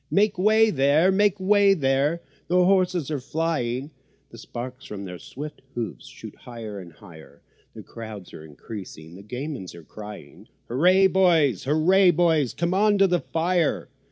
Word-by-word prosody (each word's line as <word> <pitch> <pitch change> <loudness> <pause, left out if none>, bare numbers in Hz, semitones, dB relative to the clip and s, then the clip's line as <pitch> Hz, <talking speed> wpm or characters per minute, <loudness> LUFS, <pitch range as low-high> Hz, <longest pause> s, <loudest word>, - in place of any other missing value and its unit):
Make 205 +1 +2
way 220 +3 +4
there! 145 +5 +3
make 205 0 +2
way 200 +1 +4
there! 140 +2 0 0.3
the 180 +1 +3
horses 180 -5 +1
are 145 - -1
flying, 140 -2 -2 0.4
The 115 - -12
sparks 125 +3 -8
from 100 -1 -7
their 90 -1 -8
swift 150 +3 -9
hoofs 115 - -5
shoot - - -11
higher 115 -4 -9
and 90 -2 -11
higher, 80 -4 -16 0.3
The - - -9
crowds 110 -5 -10
are 75 - -10
increasing—the 85 +1 -10
gamins 125 - -6
are 85 - -12
crying: 105 +6 -11 0.2
"Hooray, 180 +10 +4
boys!" 170 - +3
"Hooray, 175 +7 +4
boys!" 160 -6 +2
"Come 170 +5 -1
on 205 +1 +3
to 195 - +5
the 180 -2 +1
fire!" 170 0 -1
150 Hz, 155 wpm, -24 LUFS, 110-180 Hz, 0.4 s, to